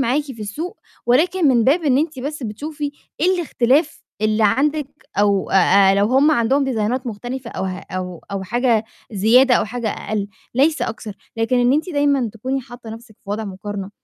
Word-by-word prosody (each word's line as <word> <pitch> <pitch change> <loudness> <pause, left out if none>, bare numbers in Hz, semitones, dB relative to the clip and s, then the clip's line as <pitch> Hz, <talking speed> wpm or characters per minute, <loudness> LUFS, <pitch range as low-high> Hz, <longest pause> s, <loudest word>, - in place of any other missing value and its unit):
معاكِ 270 +3 +1
في 265 -6 -10
السوق، 320 - -5 0.3
ولكن 320 +6 +3
من 240 -4 +4
باب 315 +6 +3
إن 270 -3 +3
أنتِ 305 -2 -1
بس 285 +2 -5
بتشوفي 290 +7 -5 0.3
إيه 340 - +3
الاختلاف 295 -3 +1 0.2
اللي 215 0 +2
عندِك 285 +6 +1 0.3
أو 200 -2 +2
آآ، 195 +1 +5
لو 200 +1 +3
هُم 270 +5 +4
عندهم 275 0 +2
ديزاينات 250 0 -1
مختلفة 240 +3 -5
أو - - -4
ه 185 -1 -3
أو 180 -2 -5
أو 195 -1 -2
حاجة 235 +2 +1 0.3
زيادة 240 +6 +5
أو - - +2
حاجة 230 +1 -3
أقل، 205 -1 -3 0.3
ليس 295 +5 +2
أكثر، 220 -1 -4 0.2
لكن 225 +3 +1
إن 245 +1 +3
أنتِ 315 +6 0
دايمًا 285 -6 +1
تكوني 260 +5 -3
حاطة 240 -2 -11
نَفْسِك 225 -1 -11
في 200 - -8
وضع 215 +2 -2
مقارنة 195 0 -6
245 Hz, 180 wpm, -20 LUFS, 210-285 Hz, 0.3 s, آآ